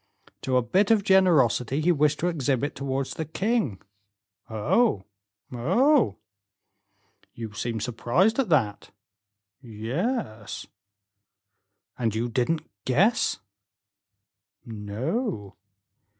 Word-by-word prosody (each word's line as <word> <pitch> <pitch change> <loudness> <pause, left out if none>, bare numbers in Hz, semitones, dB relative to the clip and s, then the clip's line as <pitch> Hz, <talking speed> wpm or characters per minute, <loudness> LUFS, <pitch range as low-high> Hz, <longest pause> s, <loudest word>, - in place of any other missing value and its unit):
"To 130 -1 +1
a 125 - +2
bit 190 - +2
of 220 -3 +4
generosity 150 - +3
he 170 +3 +3
wished 150 -2 +2
to 175 - +1
exhibit 145 -4 0
towards 135 0 -3
the 160 - -3
king." 160 - -1 0.7
"Oh, 110 - +1 0.5
oh!" 190 - +2 1.2
"You 110 -2 -7
seem 115 +2 -3
surprised 125 - +1
at 260 - +1
that?" 115 -11 +1 0.7
"Yes." 115 - -4 1.3
"And 115 -3 0
you 120 +2 -1
didn't 145 +7 -1 0.2
guess?" 190 - +2 1.2
"No." 110 - -4
135 Hz, 95 wpm, -26 LUFS, 115-185 Hz, 1.3 s, of